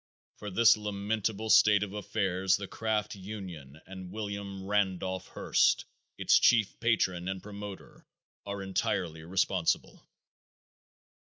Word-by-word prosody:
For 105 - -6
this 115 +4 +6
lamentable 105 +1 -2
state 105 -1 +6
of 100 -1 -6
affairs 95 -2 0
the 100 - -6
craft 110 -1 -2
union 95 -8 -8
and 95 -1 -9
William 100 -2 -5
Randolph 95 -2 -1
Hearst, - - +2 0.3
its - - +4
chief 115 -4 +3
patron 95 -6 +1
and 95 -1 -4
promoter, 100 -1 -9 0.4
are 100 -1 -5
entirely 90 -4 -2
responsible. 90 0 0
100 Hz, 110 wpm, -30 LUFS, 95-105 Hz, 0.4 s, this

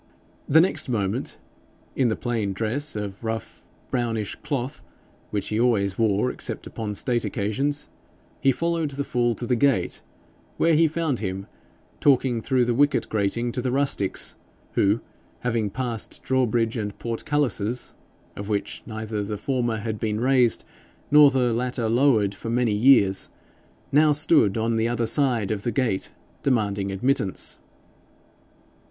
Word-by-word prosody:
The 160 +3 +7
next 180 -6 +2
moment, 100 -5 -2 0.6
in 130 - +2
the 110 - 0
plain 115 -5 -2
dress 115 +9 -1
of 100 0 -5
rough 110 -1 -5 0.3
brownish 115 -5 -1
cloth, 140 -2 -4 0.5
which 105 -1 -3
he 110 - -1
always 105 -5 +1
wore 110 +2 +2
except - - -5
upon 105 -2 -5
state 120 +1 0
occasions, 130 +8 -1 0.5
he 135 - +4
followed 165 +2 -1
the 140 0 -3
fool 120 -3 0
to 120 - -5
the 125 - +1
gate, 120 -7 +1 0.6
where 165 0 +3
he 160 +1 +5
found 160 -4 -1
him 95 -2 -4 0.5
talking 130 -4 +3
through 130 0 +1
the 120 - +1
wicket 145 +2 +2
grating 110 +3 0
to 125 - -3
the 130 - -1
rustics, 135 -8 +1 0.4
who, 105 +3 +2 0.4
having 115 -4 0
passed 120 0 -4
drawbridge 120 -3 +1
and 105 -2 -4
portcullises, 120 -2 0 0.4
of 100 +1 -7
which 105 -1 -2
neither 110 -1 -4
the 105 +1 -4
former 120 0 -1
had 110 0 -4
been 110 -1 -1
raised 125 -2 +3 0.5
nor 150 -1 +8
the 125 -3 +1
latter 125 0 -1
lowered 115 -4 +3
for 115 - -7
many 120 -2 +1
years, 105 -4 +4 0.6
now 150 +2 +5
stood 150 - +3
on 115 +1 0
the 110 +1 +1
other 120 0 0
side 120 -4 +2
of 105 -2 -2
the 120 - -2
gate 115 -5 -1 0.3
demanding 100 -6 0
admittance. 100 -1 +2
120 Hz, 145 wpm, -24 LUFS, 105-135 Hz, 0.6 s, nor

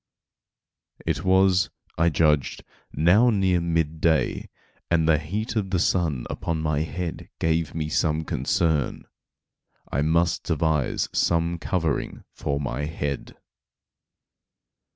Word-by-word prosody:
It 80 0 -1
was, 95 0 +4 0.3
I 85 +2 +3
judged, 75 -4 +1 0.3
now 90 - +4
near 95 -5 +2
mid 80 -2 -1
day, 80 -2 +1 0.4
and 80 -2 +2
the 80 -2 +4
heat 100 +10 -4
of 100 -3 -1
the 95 - +1
sun 80 -7 0
upon 85 -1 -3
my 75 -2 0
head 80 +2 -4
gave 80 -2 0
me 80 -2 -2
some 80 0 0
concern. 80 -3 0 0.9
I 70 - 0
must 85 +3 +2
devise 80 -4 0
some 85 0 +1
covering 80 -4 -2
for 70 -1 -2
my 70 0 -3
head. 75 -2 -4
80 Hz, 115 wpm, -25 LUFS, 75-85 Hz, 0.9 s, was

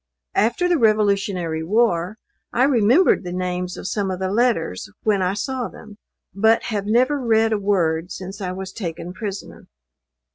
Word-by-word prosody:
After 235 - +2
the 350 -3 +2
revolutionary 200 -7 +1
war, 190 -1 +1 0.3
I 245 - +2
remembered 260 - +4
the 175 - -5
names 180 0 -3
of - - -6
some 200 -2 -1
of 185 - -2
the 190 0 -2
letters 210 - 0
when 205 -3 +2
I 185 +1 0
saw 245 +4 -3
them; 215 -1 -13 0.3
but 220 +4 +3
have 205 -3 -3
never 255 +6 +2
read 225 -1 +3
a 210 - 0
word 180 -4 0
since 195 +2 -7
I 185 -2 -2
was 190 +1 -6
taken 175 -3 -5
prisoner. 200 0 -7
200 Hz, 160 wpm, -21 LUFS, 180-225 Hz, 0.3 s, remembered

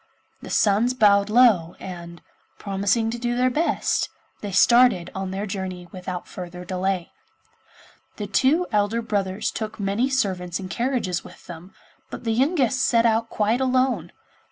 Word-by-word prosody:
The - - -9
sons 220 +5 +2
bowed 200 -3 +4
low, 215 -8 +4
and, 170 -2 -9 0.3
promising 200 +3 0
to 240 - -5
do 240 0 -1
their 255 +1 +2
best, 320 +6 0 0.3
they 205 - -5
started 235 -2 +4
on 190 0 -4
their 195 +2 -3
journey 190 -3 -5
without 180 -1 -6
further 180 0 -8
delay. 185 0 -2 1.0
The 210 - -5
two 270 - +2
elder 210 +2 +1
brothers 200 -2 -2
took 215 -1 -5
many 200 +6 0
servants 185 -9 -1
and 185 -1 -7
carriages 235 -8 -1
with - - -15
them, 175 +2 -11 0.3
but - - -8
the 225 - -1
youngest 265 0 +1
set 235 -3 +3
out 225 0 +2
quite 220 +4 0
alone. 255 0 +1
205 Hz, 150 wpm, -23 LUFS, 185-240 Hz, 1.0 s, bowed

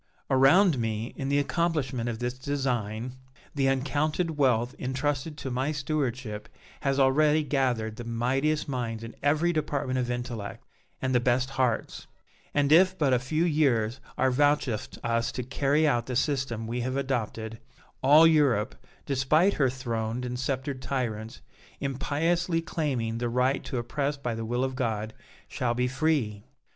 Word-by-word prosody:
Around 135 +4 +5
me, 110 0 -2
in 135 0 -3
the 140 - +2
accomplishment 145 -6 0
of 115 - -3
this 125 +1 -2
design, 130 -3 -2 0.4
the 135 -2 +1
uncounted 150 +5 0
wealth 125 -4 +2
intrusted 140 +3 -2
to 135 - -5
my 130 +4 0
stewardship 130 -7 -3 0.3
has 135 0 0
already 150 +3 +4
gathered 125 -7 0
the 120 - -6
mightiest 130 +6 0
minds 115 -4 -3
in 115 - -8
every 155 +5 +2
department 145 -4 -1
of 125 -1 -1
intellect, 120 -4 -5 0.4
and 130 0 0
the 125 - +5
best 125 +2 +1
hearts; 130 -4 -1 0.4
and 145 0 +1
if 185 +3 +6
but 145 -6 +2
a 125 - +4
few 155 +7 0
years 130 -7 +2 0.2
are 130 0 +3
vouchsafed 145 -4 +1
us 115 0 0
to 125 - -3
carry 140 +4 +1
out 120 -5 +1
the 125 - -3
system 130 -4 0
we 120 +2 -3
have 130 +2 -2
adopted, 115 -4 -3 0.4
all 150 +5 +7
Europe, 140 -10 +3 0.3
despite 155 +8 +3
her 135 -3 +2
throned 120 -2 -3
and 125 0 -4
sceptred 130 0 -2
tyrants, 115 -4 -3 0.4
impiously 165 +5 0
claiming 130 -9 -2
the 120 0 -1
right 125 +3 +1
to 130 - -3
oppress 140 +4 -2
by 125 -4 -3
the 115 0 -4
will 120 +3 -1
of 130 -1 -2
God, 110 -3 -2 0.3
shall 120 -2 -1
be 125 +1 +1
free! 130 -7 0
130 Hz, 155 wpm, -27 LUFS, 120-145 Hz, 0.4 s, all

